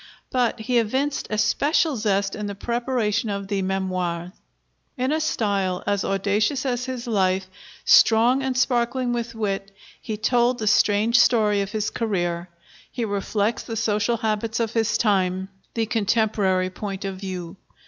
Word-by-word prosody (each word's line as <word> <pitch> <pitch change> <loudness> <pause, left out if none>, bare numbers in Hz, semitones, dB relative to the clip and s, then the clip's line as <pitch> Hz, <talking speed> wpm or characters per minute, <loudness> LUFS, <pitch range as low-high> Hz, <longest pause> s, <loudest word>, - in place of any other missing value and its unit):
But 245 -2 0
he 245 +1 +2
evinced 265 +6 -1
especial 275 +9 +2
zest 200 -3 0
in 210 0 -4
the 200 - -5
preparation 235 -1 -1
of 200 -1 -4
the 200 -2 0
'Memoires.' 185 -2 -2 0.7
In 255 +2 0
a 310 - +1
style 200 -11 -1
as 200 -1 0
audacious 205 +7 0
as 250 -1 -1
his 255 -1 -5
life, 190 -4 +1 0.4
strong 235 +4 +5
and 265 -1 -2
sparkling 245 0 +1
with 235 -1 -3
wit, 195 -3 -2 0.3
he 215 - -4
told 240 +3 +2
the 220 - -3
strange 215 +3 +4
story 210 -4 +4
of 195 0 -4
his 215 -1 -1
career. 175 -6 -2 0.4
He 240 - -2
reflects 205 +2 -1
the 225 - -6
social 220 +1 +1
habits 220 0 -1
of 230 -1 -1
his 225 -2 +1
time, 190 -3 +1 0.3
the 225 -1 +1
contemporary 210 -4 +1
point 195 0 -5
of 195 -1 -4
view. 185 -2 -6
215 Hz, 150 wpm, -23 LUFS, 195-240 Hz, 0.7 s, strong